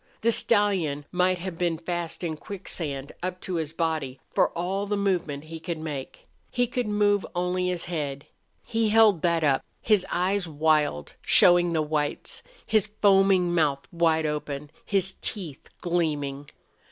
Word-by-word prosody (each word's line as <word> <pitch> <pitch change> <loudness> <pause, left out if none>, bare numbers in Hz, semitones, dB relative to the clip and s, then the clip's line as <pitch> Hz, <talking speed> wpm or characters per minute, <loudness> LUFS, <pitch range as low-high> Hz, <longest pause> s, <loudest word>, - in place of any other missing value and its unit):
The 230 - +3
stallion 190 -11 +2
might 180 0 +2
have 175 -1 -6
been 170 -2 +1
fast 175 +1 -4
in 160 -2 -2
quicksand, 155 -7 -4
up 185 0 -3
to 185 - -5
his 155 -2 -2
body, 160 -5 -2
for - - +3
all 190 +4 -1
the 205 0 0
movement 175 -8 -1
he 160 +1 -8
could 170 0 -4
make. 150 -4 -6 0.2
He 245 0 +1
could 245 -1 -2
move 205 -1 +2
only 180 +1 0
his 180 -2 -1
head. 145 -5 -4 0.4
He 225 -1 0
held 215 -5 +5
that 170 -2 +2
up, 140 -3 +2 0.2
his 210 -4 +3
eyes 185 +1 0
wild, 150 - +1
showing 175 -1 +5
the 160 -1 +1
whites, 150 -1 -2 0.2
his 215 -2 +2
foaming 195 -3 +3
mouth 145 -5 +1
wide 165 -2 +2
open, 150 -1 -4 0.2
his 190 -2 +1
teeth 175 -10 -5
gleaming. 145 -5 -1
175 Hz, 150 wpm, -26 LUFS, 155-195 Hz, 0.4 s, held